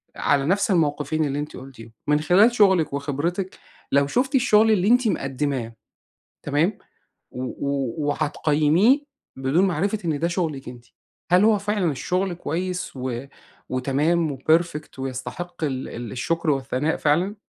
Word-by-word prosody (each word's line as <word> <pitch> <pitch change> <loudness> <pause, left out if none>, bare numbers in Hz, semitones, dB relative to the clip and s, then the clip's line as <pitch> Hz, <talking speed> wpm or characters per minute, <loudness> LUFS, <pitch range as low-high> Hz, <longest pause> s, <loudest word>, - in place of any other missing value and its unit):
على 140 -1 +1
نفس 200 +6 +1
المَوقفين 155 -2 +1
اللي 140 0 -2
أنتِ 150 +1 -6
قُلتيهم، 125 -4 -12 0.2
من 150 0 +3
خلال 195 +9 +5
شُغلِك 190 - +4
وخبرتِك، 150 +7 -2 0.3
لو 140 0 +3
شُفتِ 265 - 0
الشغل 220 -3 +4
اللي 200 -2 +2
أنتِ 245 +1 +4
مقدِّماه، 135 - -2 0.7
تمام، 155 +8 0 0.5
و 125 - -5
و 135 -2 -3
وهتقيِّميه 155 - +2 0.3
بدون 135 +8 +2
معرفة 195 +5 -1
إن 155 -3 -1
ده 170 - +1
شغلِك 160 -7 -3
أنتِ، 120 -1 -12 0.5
هل 180 +3 +6
هو 220 -1 +5
فعلًا 200 -4 0
الشغل 180 +7 -1
كويِّس 180 +1 -4
و 125 0 -4 0.4
وتمام 140 +4 0
وperfect 155 -1 0
ويستحق 135 +7 -5
ال 135 -3 -2
ال 120 -2 -7
الشُّكر 165 +5 -1
والثناء 135 +2 -1
فعلًا؟ 175 +8 +1
155 Hz, 135 wpm, -23 LUFS, 135-185 Hz, 0.7 s, هل